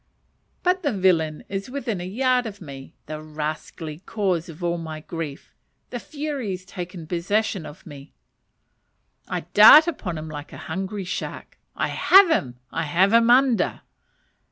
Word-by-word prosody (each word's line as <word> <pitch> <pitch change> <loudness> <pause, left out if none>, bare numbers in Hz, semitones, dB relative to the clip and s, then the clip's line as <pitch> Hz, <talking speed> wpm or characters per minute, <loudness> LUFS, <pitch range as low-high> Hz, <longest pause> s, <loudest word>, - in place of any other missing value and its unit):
But 365 +1 +2
the 290 - 0
villain 170 -6 +1
is 195 +3 -5
within 245 -8 -3
a 180 - -5
yard 250 +4 +1
of 205 -2 -9
me 135 -5 -10
the 155 0 -6
rascally 155 +1 -5
cause 185 -4 -2
of 165 +2 -10
all 170 0 0
my 160 -1 -6
grief. 155 -3 -7 0.4
The 245 - -4
furies 270 - -5
take 180 -1 -7
possession 190 +1 -1
of 150 - -13
me! 140 0 -11 1.2
I - - -3
dart 310 +1 +10
upon 215 - -4
him 155 +1 -6
like 150 -1 -8
a - - -8
hungry 190 +3 -5
shark! 180 - -6 0.2
I - - -1
have 385 -2 +6
him! 125 - 0
I 165 - -2
have 185 +7 +3
him 230 0 +5
under! 250 -1 +3
185 Hz, 155 wpm, -24 LUFS, 155-230 Hz, 1.2 s, dart